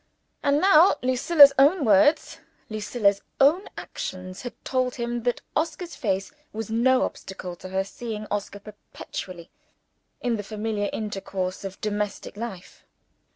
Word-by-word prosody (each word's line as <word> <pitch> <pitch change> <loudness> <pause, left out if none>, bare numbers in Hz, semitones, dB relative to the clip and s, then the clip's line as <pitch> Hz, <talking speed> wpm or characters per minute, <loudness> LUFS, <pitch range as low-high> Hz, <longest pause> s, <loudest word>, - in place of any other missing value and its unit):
And 285 +1 +2
now 365 0 +6
Lucilla's 275 +3 +6
own 290 +3 +5
words, 230 +10 +3 0.3
Lucilla's 210 -1 +1 0.2
own 305 +8 +4
actions, 185 0 -6
had 245 - -6
told 255 -1 0
him 240 -1 -3
that 245 0 -1
Oscar's 330 +3 -2
face 195 -6 -2 0.2
was 220 0 -6
no 255 +3 +3
obstacle 185 -2 -6
to 185 - -9
her 190 +1 0
seeing 215 +1 -6
Oscar 200 -1 -3
perpetually 190 -4 -9 0.7
in 240 -2 -1
the 205 - -5
familiar 210 0 -3
intercourse 195 -3 -4
of 195 0 -7
domestic 210 -1 -3
life. 205 -5 -8
220 Hz, 130 wpm, -25 LUFS, 195-260 Hz, 0.7 s, now